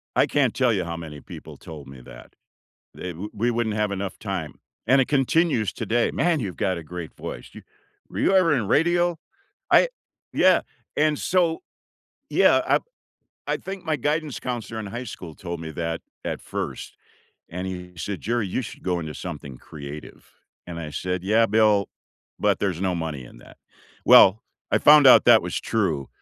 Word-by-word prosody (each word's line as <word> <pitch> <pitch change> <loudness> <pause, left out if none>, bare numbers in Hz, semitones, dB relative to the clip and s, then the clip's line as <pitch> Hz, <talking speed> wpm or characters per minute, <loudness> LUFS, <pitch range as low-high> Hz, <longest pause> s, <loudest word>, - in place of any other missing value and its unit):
I - - +4
can't 135 -6 +1
tell 125 -3 +2
you 95 -4 0
how 85 0 -4
many 75 -3 -8
people - - -11
told 75 -4 -11
me 65 -1 -11
that. - - -14 0.6
They 90 - -6
wo 90 +6 -7
we 115 +3 0
wouldn't 115 -2 -1
have 105 -1 0
enough 100 -1 -4
time, 95 -7 -4 0.3
and 135 +1 +5
it 130 - +1
continues 140 - +2
today. 120 +1 0
"Man, 170 -3 +1
you've 95 -6 -4
got 95 -2 0
a - - -7
great 85 0 -7
voice. - - -7
You - - -11 0.5
were - - -7
you - - +3
ever 175 -5 +5
in 115 -8 -1
radio?" 175 +2 +2 0.5
I - - +6 0.4
Yeah, - - +4 0.3
and 150 -1 +2
so, 175 -3 +1 0.7
yeah, - - +4
I - - +4 0.7
I - - 0
think 195 -1 -7
my 160 -1 +1
guidance 150 +1 -1
counselor 120 -3 -4
in 105 - -5
high 120 +5 -5
school 85 -9 -9
told 85 -2 -6
me 80 -1 -6
that 80 +1 -3 0.2
at - - -3
1st, - - -6 0.5
and 90 +2 -5
he 90 -1 -7
said, 95 +3 -4
"Jerry, 115 0 -1
you 110 - -2
should 110 - -9
go 90 -2 -1
into 80 -2 -6
something 70 -7 -7
creative," 75 0 -10 0.3
and 85 -1 -7
I 80 -2 -6
said, 90 +4 -3
"Yeah, 110 +3 +4
Bill, 105 -2 +3 0.5
but - - +2
there's 90 -4 -1
no 95 -2 0
money 80 -6 -4
in - - -14
that." - - -17 0.5
Well, 100 +3 +7 0.3
I - - +3
found 150 -1 +7
out 130 - +8
that 120 -2 +7
was 90 - -3
true, 85 -12 -1
100 Hz, 185 wpm, -24 LUFS, 85-125 Hz, 0.7 s, out